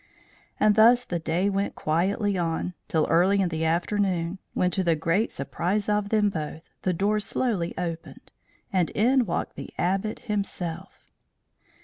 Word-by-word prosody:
And 210 0 +5
thus 235 +3 +6
the 175 - -2
day 165 +4 0
went 200 0 -1
quietly 195 +6 0
on, 170 0 -1
till 160 -2 +1
early 185 +4 +3
in 190 -3 +2
the 160 -1 -2
afternoon; 175 +1 0 0.2
when, 180 0 +2
to 190 - 0
the 170 -2 +3
great 165 +8 +1
surprise 180 +9 -1
of 210 -1 0
both 215 -1 +2
of 205 - +3
them, 155 -2 -4 0.2
the 185 - 0
door 205 +5 +1
slowly 205 -4 -1
opened, 170 -2 -6 0.4
and 180 -3 +2
in 245 +2 +2
walked 170 - -2
the - - -7
Abbot 195 +4 -1
himself. 195 -5 -5
190 Hz, 155 wpm, -26 LUFS, 170-210 Hz, 0.4 s, thus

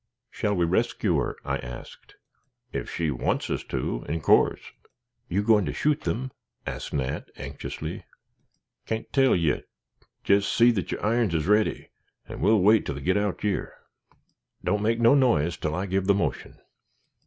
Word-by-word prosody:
"Shall 105 -1 -1
we 85 -2 +2
rescue 85 +3 +1
her?" - - -2
I - - -1
asked. 60 0 -10 0.6
"Ef - - -3
she 80 -3 -1
wants 65 - -1
us - - -2
to, - - -3
in 80 +1 -2
course." - - +3 0.6
"You 100 +4 0
going 105 -2 +4
to - - -3
shoot 150 0 +1
them?" 130 +3 -3 0.3
asked - - -5
Nat, 70 -1 -2
anxiously. 70 +2 -6 0.8
"Can't 110 0 -4
tell 135 -2 +4
yit. 80 -4 0 0.5
Jest 100 0 +3
see 120 +1 +5
that 100 -5 -3
yer - - -1
irons 110 -5 +1
is 80 - 0
ready, 105 +3 +1 0.4
and - - -8
we'll 105 -1 +4
wait 105 +3 +5
till 75 - -3
they 70 - -7
get 95 +6 +1
out 100 -1 -1
yer. 105 -2 -2 0.9
Don't 105 - 0
make 115 +2 +1
no 115 +2 +6
noise 100 - +3
till 80 0 -3
I 90 - -2
give 95 0 -1
the 100 - +5
motion." 100 - -3
100 Hz, 165 wpm, -26 LUFS, 80-110 Hz, 0.9 s, no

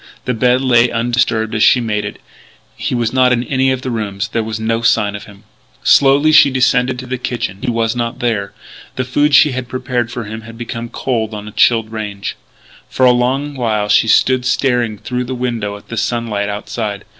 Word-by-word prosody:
The 125 - 0
bed 125 +2 +2
lay 120 -2 +4
undisturbed 115 -1 0
as 110 - -1
she 125 - +6
had 120 - -3
made 105 -2 -1
it. 105 - -7 0.6
He - - -3
was 120 -1 -1
not 130 -1 +4
in 120 -1 +1
any 130 +1 +1
of 130 0 -3
the 130 - -3
rooms; 100 -3 -3
there 115 - -1
were 110 0 -4
no 115 +1 -1
signs 105 -3 +2
of 105 - -8
him. 100 -1 -16 0.4
Slowly 140 +3 +5
she 155 -2 +7
descended 125 -1 +1
to 130 - -7
the 130 0 -4
kitchen. 115 -6 -4
He 130 - -2
was 115 0 0
not 120 -1 -3
there. 110 -5 -2 0.4
The 130 - -2
food 145 +3 +2
she 150 - +6
had 130 -1 -4
prepared 125 -2 -2
for 120 - -5
him 110 +1 -7
had 115 +1 -12
become 115 0 -6
cold 115 -4 -2
on 105 0 -7
a - - -8
chilled 115 0 +2
range. 105 -3 -5 0.5
For 130 - +1
a 125 - +7
long 130 +4 0
while 110 -5 -1
she 110 - +4
stood 130 +2 +3
staring 125 -4 0
through 125 +4 -4
the 130 +1 -4
window 115 -5 -3
at 100 - -19
the 115 - -5
sunlight 110 -3 -1
outside. 105 0 -4
120 Hz, 215 wpm, -16 LUFS, 110-125 Hz, 0.6 s, she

